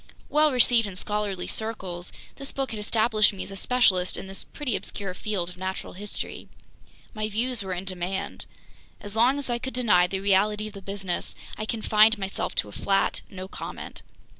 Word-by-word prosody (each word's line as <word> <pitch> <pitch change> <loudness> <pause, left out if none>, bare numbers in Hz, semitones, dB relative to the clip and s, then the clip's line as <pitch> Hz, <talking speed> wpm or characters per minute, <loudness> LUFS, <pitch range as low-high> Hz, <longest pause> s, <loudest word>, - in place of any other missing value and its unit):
Well 305 0 +4
received 240 -3 +4
in 195 - -7
scholarly 205 -1 -1
circles, 190 -6 -2 0.3
this 275 0 -3
book 270 -3 -2
had 220 - -4
established 215 0 +3
me 195 - -5
as - - -9
a - - -6
specialist 195 -5 +3
in - - -6
this 195 0 -1
pretty 270 -7 -3
obscure 195 -3 0
field 185 -3 -2
of 180 - -13
natural 190 +1 -4
history. 205 +2 -4 0.6
My 215 -2 -2
views 235 +2 +3
were 190 -2 -3
in 180 +2 -5
demand. 185 0 -3 0.5
As 205 +1 -6
long 245 +5 +4
as 285 - -2
I 240 -1 0
could 260 +1 -5
deny 210 -8 +4
the 190 +1 -2
reality 205 +2 +2
of 215 - -7
the 200 - -9
business, 195 -2 -3 0.2
I 215 - -4
confined 220 0 +4
myself 195 -1 -3
to - - +1
a - - -10
flat 195 - +1
"no 185 -1 -7
comment." - - -7
205 Hz, 190 wpm, -26 LUFS, 190-225 Hz, 0.6 s, Well